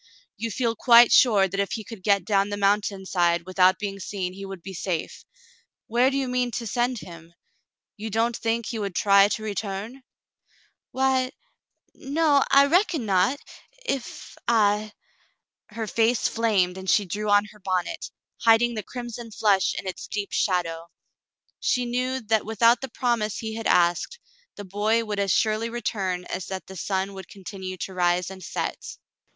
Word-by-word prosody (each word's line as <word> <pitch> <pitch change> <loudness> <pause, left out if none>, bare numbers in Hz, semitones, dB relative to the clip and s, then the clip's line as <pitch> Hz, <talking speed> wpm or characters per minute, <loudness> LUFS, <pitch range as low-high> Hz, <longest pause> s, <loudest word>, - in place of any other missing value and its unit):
"You 230 +3 -4
feel 230 +1 -1
quite 235 +1 +7
sure 205 -6 +5
that 195 +2 -4
if 200 - -1
he 220 - -4
could 215 -1 -10
get 200 -2 +2
down 200 -1 +2
the 205 - -3
mountain 200 -1 +1
side 170 -2 +1
without 185 0 +3
being 195 -1 -5
seen, 185 -1 -4
he 195 +1 -8
would 190 -3 -9
be 195 - -7
safe; 170 -2 -4 0.6
where 240 +3 +3
do 275 - -2
you 270 -1 -1
mean 250 0 0
to 235 +1 -3
send 245 +3 0
him? 170 -1 -12 0.6
You 215 +2 -5
don't 225 +2 0
think 230 0 -1
he 230 - -4
would 200 -3 -4
try 200 -1 +5
to 215 +1 -3
return? 210 +4 -5 0.3
" - - -39
" - - -42
Why 260 0 +1 0.3
— - - -47
no, 285 0 +2
I 275 +1 +6
reckon 330 - +2
not 195 +7 +2 0.3
— - - -26
if 260 - -10
— - - -51
I 215 -2 +2 0.3
— - - -39
" - - -68
Her 225 - -2
face 225 +2 +1
flamed, 195 -5 +1
and 190 0 -5
she 205 - +3
drew 210 +4 -3
on 205 0 +4
her 210 - -18
bonnet, 185 - -2 0.3
hiding 230 +1 +4
the 215 - -3
crimson 240 0 -7
flush 205 -3 +2
in - - -5
its 185 - -6
deep 205 -1 -4
shadow. 170 -3 -1 0.7
She 250 -1 +1
knew 255 +2 -1
that 220 -1 +1
without 230 +2 +3
the 270 - -5
promise 230 -4 -1
he 220 -1 -5
had 225 0 -3
asked, 175 - +2 0.4
the 205 - -8
boy 215 +4 0
would 210 -1 -3
as 200 -2 +1
surely 220 +3 +1
return 195 -6 -3
as 185 - -5
that 190 -1 -5
the 190 - -11
sun 190 +2 -2
would 190 -2 -9
continue 190 -1 -8
to 190 - -6
rise 180 0 +1
and 190 -1 -10
set. - - -5
210 Hz, 185 wpm, -25 LUFS, 190-235 Hz, 0.7 s, quite